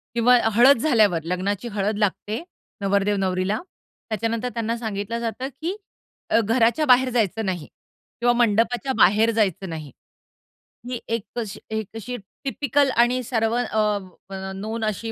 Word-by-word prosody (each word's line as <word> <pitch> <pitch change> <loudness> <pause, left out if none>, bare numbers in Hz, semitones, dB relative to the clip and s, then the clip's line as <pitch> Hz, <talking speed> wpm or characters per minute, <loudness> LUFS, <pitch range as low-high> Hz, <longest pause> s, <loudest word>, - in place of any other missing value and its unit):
किंवा 245 +1 +5 0.2
हळद 245 +5 +7
झाल्यावर 215 - +3
लग्नाची 190 +5 -2
हळद 205 +1 0
लागते 210 - -1 0.4
नवरदेव 200 +1 +2
नवरीला, 190 +2 0 0.5
त्याच्यानंतर 230 +3 -1
त्यांना 230 0 -2
सांगितलं 220 0 -3
जातं, 235 +3 -3
की 350 +4 -2 0.5
अ, - - +4
घराच्या 230 +7 +2
बाहेर 255 0 +5
जायचं 225 -3 0
नाही 180 -5 -3 0.5
किंवा 240 0 +4
मंडपाच्या 240 +3 +1
बाहेर 215 +4 +5
जायचं 195 -4 0
नाही. 155 -4 -7 1.0
ही 250 -1 -3
एक 230 -2 -1 0.2
अशी 215 -5 -5 0.2
एक 220 -3 -3
अशी 225 +3 -5 0.3
टिपिकल 280 0 +1
आणि 250 +1 0
सर्व 225 -2 0
अ, 215 -4 +1 0.3
म - - -9 0.3
नोन 225 +1 -4
अशी 220 +2 -3
225 Hz, 140 wpm, -23 LUFS, 200-240 Hz, 1.0 s, हळद